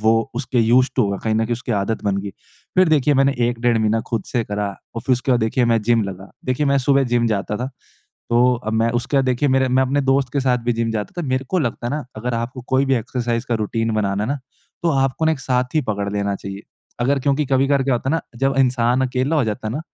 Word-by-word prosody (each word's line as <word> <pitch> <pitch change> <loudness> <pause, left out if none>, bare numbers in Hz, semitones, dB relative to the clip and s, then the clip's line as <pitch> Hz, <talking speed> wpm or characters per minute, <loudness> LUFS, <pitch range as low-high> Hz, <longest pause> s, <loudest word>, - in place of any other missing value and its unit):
वो 110 +1 +4 0.2
उसके 125 0 -1
used 125 +3 +4
to 130 - +4
होगा 100 -1 -1
कहीं 110 -1 +1
न 110 +1 +2
कहीं 115 - -2
उसकी 120 0 -3
आदत 105 +2 -1
बन 100 -1 +1
गई। 100 - -5 0.4
फ़िर 185 -1 +5
देखिए 150 -2 +3
मैंने 135 +1 +3 0.2
1 120 -1 -3
डेढ़ 120 -1 +2
महीना 110 +1 +1
ख़ुद 115 -3 0
से 120 - -1
करा 105 0 -2 0.3
और 115 - -3
फ़िर 130 - +1
उसके 125 +2 0
बाद 125 - +2
देखिए 110 +3 +1
मैं 115 -1 +2
जिम 115 +1 +3
लगा। 95 0 -8
देखिए 130 +3 0
मैं 140 0 +3
सुबह 135 +1 +3
जिम 120 -1 +1
जाता 105 -1 -1
था। 125 - -3 0.6
तो 125 +2 +4
अब 110 - -1
मैं 115 +1 +2
उसके 130 +4 -2
बाद 135 - +3
देखिए 130 +2 +1
मेरे 130 0 +2
मैं 130 +1 +3
अपने 135 +2 +1
दोस्त 135 0 +2
के 140 - +1
साथ 130 -2 +2
भी 120 - +2
जिम 115 0 -1
जाता 105 -2 -3
था। 165 - -4
मेरे 130 +1 0
को 185 - +1
लगता 120 -5 -2
है - - -2
ना 150 +1 -3
अगर 120 +3 -3
आपको 120 +2 -4
कोई 130 +1 +3
भी 135 - +3
एक्सरसाइज़ 120 0 -2
का 120 - 0
रूटीन 115 +1 -1
बनाना 100 -1 0
है - - -4
ना 140 +2 -1 0.4
तो 170 - +2
आपको 135 +1 +1
ना 160 - +4
एक 150 - -5
साथी 125 +3 0
पकड़ 100 -1 -2
लेना 100 -1 -1
चाहिए। 100 +1 -8 0.4
अगर 135 +3 +2
क्योंकि 140 +3 +1
कभी-कभार 135 +1 +2
क्या 135 -1 +1
होता 125 +2 -1
ना 165 +1 +1 0.2
जब 135 +2 +1
इंसान 125 -1 +2
अकेला 130 +5 0
हो 145 - +2
जाता 110 0 -3
ना 125 +8 -3
125 Hz, 260 wpm, -20 LUFS, 115-135 Hz, 0.6 s, फ़िर